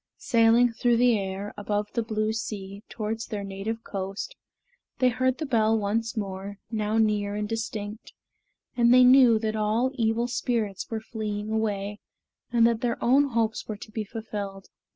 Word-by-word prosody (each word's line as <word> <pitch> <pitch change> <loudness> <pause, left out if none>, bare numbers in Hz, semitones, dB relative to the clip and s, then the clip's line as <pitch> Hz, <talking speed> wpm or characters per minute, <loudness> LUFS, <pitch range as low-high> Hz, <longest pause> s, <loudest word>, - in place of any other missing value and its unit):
Sailing 230 +1 +4
through 240 +1 +2
the 245 -1 +4
air, 195 +1 -4
above 205 0 -2
the 235 - +1
blue 215 -1 -1
sea, 200 -3 -5
towards 220 0 -4
their 210 -3 -4
native 200 +4 -4
coast, 195 - -5 0.6
they 255 - +4
heard 255 +1 0
the 310 - -3
bell 225 -4 +2
once 225 +3 -1
more, 195 0 -4
now 215 -1 0
near 210 -2 +1
and 210 0 -2
distinct, 215 -1 -5 0.6
and 235 -1 +4
they 255 0 +8
knew 250 -2 +7
that 215 0 -2
all 220 +4 +1
evil 230 -1 0
spirits 230 -5 -2
were 225 -1 -3
fleeing 215 -1 -4
away, 210 -2 -1 0.5
and 235 -1 +4
that 230 -1 +2
their 240 -2 0
own 270 +4 +4
hopes 230 -4 -1
were 215 - -4
to 215 - -11
be 220 0 -3
fulfilled. 205 -3 -6
220 Hz, 165 wpm, -26 LUFS, 205-235 Hz, 0.6 s, they